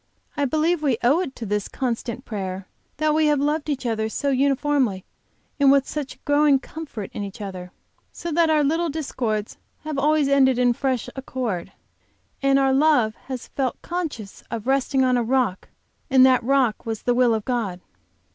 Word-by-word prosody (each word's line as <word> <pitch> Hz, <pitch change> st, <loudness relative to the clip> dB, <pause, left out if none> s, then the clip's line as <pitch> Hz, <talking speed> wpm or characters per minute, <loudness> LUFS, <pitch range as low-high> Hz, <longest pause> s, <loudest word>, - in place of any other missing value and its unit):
I 290 Hz, -2 st, 0 dB
believe 315 Hz, +4 st, +1 dB
we 270 Hz, -6 st, +1 dB
owe 275 Hz, +8 st, +4 dB
it 320 Hz, -8 st, -4 dB
to 230 Hz, -, -6 dB
this 205 Hz, -1 st, -1 dB
constant 245 Hz, 0 st, -3 dB
prayer 190 Hz, -3 st, -5 dB, 0.3 s
that 310 Hz, +1 st, +1 dB
we 310 Hz, 0 st, +3 dB
have 295 Hz, -1 st, +3 dB
loved 300 Hz, +2 st, -1 dB
each 275 Hz, -3 st, -2 dB
other 220 Hz, -2 st, -1 dB
so 280 Hz, +5 st, -1 dB
uniformly 270 Hz, -6 st, +1 dB, 0.5 s
and 280 Hz, -1 st, +6 dB
with 275 Hz, -1 st, +3 dB
such 290 Hz, -3 st, -5 dB
growing 290 Hz, -1 st, +4 dB
comfort 270 Hz, -7 st, -8 dB
in -, -, -5 dB
each 200 Hz, +1 st, -8 dB
other; 185 Hz, -3 st, -7 dB, 0.4 s
so 340 Hz, -, -6 dB
that 330 Hz, +1 st, +3 dB
our 305 Hz, -1 st, +3 dB
little 325 Hz, +4 st, +1 dB
discords 240 Hz, -8 st, -3 dB, 0.3 s
always 305 Hz, 0 st, +1 dB
have 275 Hz, 0 st, +3 dB
ended 265 Hz, -2 st, +4 dB
in 245 Hz, -1 st, +3 dB
fresh 260 Hz, -2 st, -1 dB
accord, 255 Hz, -8 st, -4 dB, 0.7 s
and 275 Hz, 0 st, +3 dB
our 270 Hz, -1 st, +3 dB
love 270 Hz, -6 st, +3 dB
has 260 Hz, -2 st, -6 dB
felt 265 Hz, -3 st, -2 dB
conscious 310 Hz, -, -5 dB
of 225 Hz, -2 st, -5 dB
resting 270 Hz, 0 st, +2 dB
on 255 Hz, -1 st, +3 dB
a 240 Hz, -, +1 dB
rock 240 Hz, -5 st, 0 dB, 0.4 s
and 260 Hz, -1 st, +6 dB
that 255 Hz, -1 st, +4 dB
that 235 Hz, -, -9 dB
rock 265 Hz, -5 st, +2 dB
was 225 Hz, -1 st, -5 dB
the 245 Hz, -, +2 dB
will 240 Hz, -2 st, +3 dB
of 215 Hz, -, -4 dB
God." 225 Hz, -8 st, -2 dB
265 Hz, 185 wpm, -23 LUFS, 230-290 Hz, 0.7 s, and